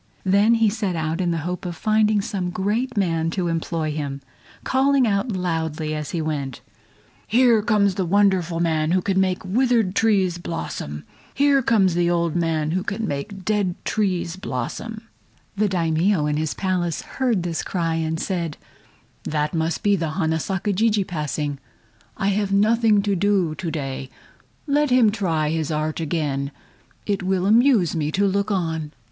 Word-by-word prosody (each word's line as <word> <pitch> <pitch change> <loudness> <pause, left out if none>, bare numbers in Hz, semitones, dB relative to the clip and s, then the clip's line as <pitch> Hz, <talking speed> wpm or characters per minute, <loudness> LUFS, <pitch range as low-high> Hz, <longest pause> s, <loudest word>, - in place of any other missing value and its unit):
Then 200 +4 +4
he 225 -1 +3
set 205 -3 -1
out 160 +2 -1
in 175 - 0
the 170 - 0
hope 180 0 -3
of 175 -2 -4
finding 215 +2 +2
some 195 -4 -3
great 210 +7 -1
man 165 -4 +1
to 175 +1 -2
employ 165 -1 -2
him, 145 -2 -4 0.4
calling 270 0 +3
out 210 +2 0
loudly 160 -4 -2
as 150 -1 -4
he 165 -2 -2
went 140 -4 -3
along: 105 0 -31
"Here 235 -1 +4
comes 205 -2 +2
the 190 - -1
wonderful 185 -3 +2
man 160 -1 +1
who 185 - +3
can 190 -1 +2
make 185 0 -1
withered 230 -1 +2
trees 195 -6 +2
blossom! 75 - -5 0.3
Here 280 0 +4
comes 205 -7 +3
the 175 0 +2
old 170 -2 0
man 160 -3 0
who 185 +2 0
can 210 +2 -3
make 190 +6 -5
dead 205 -4 0
trees 185 -5 -1
blossom!" 215 - -5 0.5
The 210 +1 +1
Daimio 170 0 +1
in 150 0 0
his 155 -1 -2
Palace 180 -3 -1
heard 240 -9 -1
this 170 -2 -2
cry, 165 -3 -1
and 160 0 -1
said: 170 -5 -2 0.7
"That 150 0 -1
must 160 -1 -1
be 205 -1 +4
the 165 -4 -2
Hana 160 0 0
Saka 195 +4 -1
Jijii 210 0 +2
passing. 150 -4 -3 0.6
I 200 -2 +1
have 200 0 0
nothing 215 +1 +3
to 200 -1 +1
do 190 -3 +1
to 175 +1 -4
day. 135 -4 -4 0.6
Let 295 0 +2
him 250 -4 +5
try 165 -8 0
his 160 -1 -1
art 155 0 -2
again; 145 -4 -1 0.6
it 200 -2 -1
will 185 0 0
amuse 220 - +4
me 150 -1 -1
to 200 +2 +2
look 200 +1 0
on." 160 -6 -2
180 Hz, 170 wpm, -22 LUFS, 160-205 Hz, 0.7 s, him